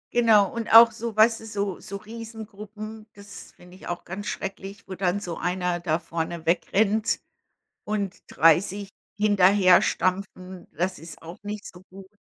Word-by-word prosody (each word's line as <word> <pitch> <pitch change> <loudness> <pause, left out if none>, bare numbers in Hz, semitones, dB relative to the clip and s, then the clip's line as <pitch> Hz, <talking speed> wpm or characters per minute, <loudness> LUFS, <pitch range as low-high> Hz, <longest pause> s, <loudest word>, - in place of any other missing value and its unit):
Genau 225 -4 +5
und 230 -1 -4
auch 230 +1 +9
so 230 0 -6
weißt 225 +1 +4
du, 225 - -11
so 200 -4 -3
so 200 - -8
Riesengruppen, 215 0 -9
das 200 0 -11
finde 180 +1 -17
ich 190 - -12
auch 175 0 -4
ganz 200 +3 -6
schrecklich, 195 +1 -6
wo 190 - -6
dann 185 +1 0
so 175 -5 -6
einer 180 -1 -1
da 165 -2 0
vorne 165 0 -5
wegrennt 205 +5 +1 0.7
und 200 -2 -3
30 185 +5 +2 0.3
hinterherstampfen, 190 -2 +2
das 185 +2 -2
ist 160 +1 -11
auch 165 +2 -10
nicht 210 0 -6
so 180 - -15
gut. 190 0 -13
195 Hz, 150 wpm, -25 LUFS, 180-215 Hz, 0.7 s, auch